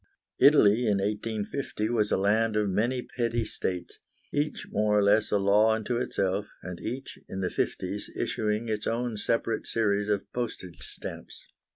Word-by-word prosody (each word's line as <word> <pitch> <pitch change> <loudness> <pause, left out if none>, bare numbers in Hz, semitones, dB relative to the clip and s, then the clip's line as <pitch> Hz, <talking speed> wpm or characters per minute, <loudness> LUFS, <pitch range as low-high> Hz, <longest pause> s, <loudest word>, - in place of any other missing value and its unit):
Italy 120 -5 +6
in 105 -2 +3
1850 105 +3 -2
was 110 -3 +1
a - - +2
land 110 +3 +2
of 105 -1 +2
many 120 +6 0
petty 115 -2 -1
states, 90 -4 -4 0.3
each 145 +1 -1
more 105 0 +2
or 105 - +4
less 105 +2 +4
a 105 - +3
law 105 +3 +4
unto 115 +2 -2
itself, 100 -4 -1 0.2
and 90 -1 -6
each, 130 +4 -5
in 95 - -4
the 90 - -1
fifties, - - -2
issuing 110 +1 -1
its 110 -1 -2
own 120 0 -1
separate 115 +1 -1
series 105 -2 +1
of 100 -2 +1
postage 100 -8 -4
stamps. - - -8
105 Hz, 160 wpm, -28 LUFS, 100-115 Hz, 0.3 s, Italy